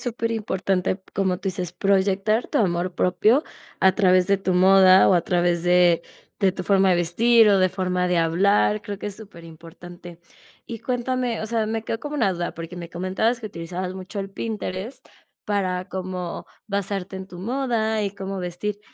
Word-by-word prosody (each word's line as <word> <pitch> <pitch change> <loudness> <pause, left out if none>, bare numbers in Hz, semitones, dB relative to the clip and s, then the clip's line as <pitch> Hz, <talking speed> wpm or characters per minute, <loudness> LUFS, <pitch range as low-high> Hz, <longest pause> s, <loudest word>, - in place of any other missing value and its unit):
superimportante, 215 -6 -2
como 190 -2 0
tú 195 - -3
dices 180 -2 -4
proyectar 200 +3 +1
tu - - 0
amor 175 -3 0
propio 215 - +2 0.4
a 190 - +5
través 185 -3 +3
de 200 0 +3
tu 190 -1 -1
moda 190 0 +6
o 190 - +5
a 175 - +4
través 175 -1 +1
de 175 -1 +4 0.4
de 195 -2 +2
tu 185 -1 -6
forma 195 -1 +3
de 180 - +3
vestir, 220 +7 +4
o 200 -1 +4
de 185 -1 +3
forma 180 -1 -1
de 180 - +1
hablar. 200 +5 +2
Creo 200 -1 -6
que - - -6
es 205 -2 -6
superimportante 175 -2 -12 0.5
y 230 -2 -7
cuéntame, 250 -1 -2
o 220 - -4
sea, 225 -1 0
me 225 0 -2
quedo 225 - -3
como 295 0 -6
una 225 -8 +2
duda 175 0 -3
porque 165 +2 -8
me 170 -1 -8
comentabas 190 +7 -1
que 220 - -5
utilizabas 180 0 -5
mucho 190 +2 -8
el 195 - -5
Pinterest 210 +1 -5 0.4
para 185 -3 -1
cómo 185 -1 -5 0.2
basarte 195 -2 -3
en 190 0 -7
tu 180 -2 -12
moda 225 0 -1
y 200 - -1
cómo 195 -1 -5
vestir 185 +3 -4
190 Hz, 180 wpm, -23 LUFS, 180-215 Hz, 0.5 s, moda